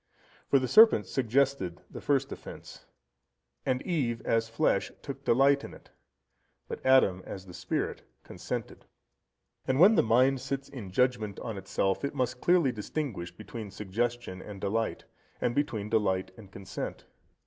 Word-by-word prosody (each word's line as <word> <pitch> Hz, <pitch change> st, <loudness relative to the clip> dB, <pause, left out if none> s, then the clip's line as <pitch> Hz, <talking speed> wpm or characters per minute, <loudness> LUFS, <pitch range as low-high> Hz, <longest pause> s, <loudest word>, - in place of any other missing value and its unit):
For 140 Hz, -, +5 dB
the 130 Hz, -1 st, 0 dB
serpent 220 Hz, -, +7 dB
suggested 130 Hz, -7 st, 0 dB
the -, -, -9 dB
first 140 Hz, -1 st, +1 dB
offence, -, -, -10 dB, 0.8 s
and 130 Hz, 0 st, +1 dB
Eve, 130 Hz, -10 st, -1 dB
as 115 Hz, 0 st, +1 dB
flesh, 115 Hz, -, +1 dB
took -, -, -7 dB
delight 140 Hz, +3 st, +4 dB
in -, -, -8 dB
it, -, -, -18 dB, 0.8 s
but -, -, -6 dB
Adam, 130 Hz, -9 st, +4 dB
as 95 Hz, -1 st, -8 dB
the 90 Hz, -, -11 dB
spirit, -, -, -3 dB, 0.2 s
consented. -, -, -6 dB, 0.8 s
And 130 Hz, +1 st, +1 dB
when 195 Hz, +6 st, +8 dB
the -, -, +5 dB
mind 130 Hz, +4 st, +3 dB
sits 135 Hz, 0 st, -4 dB
in 110 Hz, -8 st, -8 dB
judgement 110 Hz, -1 st, 0 dB
on 115 Hz, -3 st, -4 dB
itself, 95 Hz, +1 st, -1 dB
it 140 Hz, +1 st, -2 dB
must 125 Hz, -2 st, -1 dB
clearly 175 Hz, -7 st, +4 dB
distinguish 105 Hz, -, -4 dB
between 105 Hz, +4 st, -8 dB
suggestion 105 Hz, 0 st, -3 dB
and 100 Hz, -1 st, -9 dB
delight, 110 Hz, +3 st, -2 dB, 0.3 s
and 120 Hz, -, 0 dB
between 115 Hz, -7 st, -1 dB
delight 95 Hz, -4 st, +1 dB
and 100 Hz, -2 st, -14 dB
consent. 95 Hz, -1 st, -6 dB
115 Hz, 150 wpm, -29 LUFS, 100-135 Hz, 0.8 s, when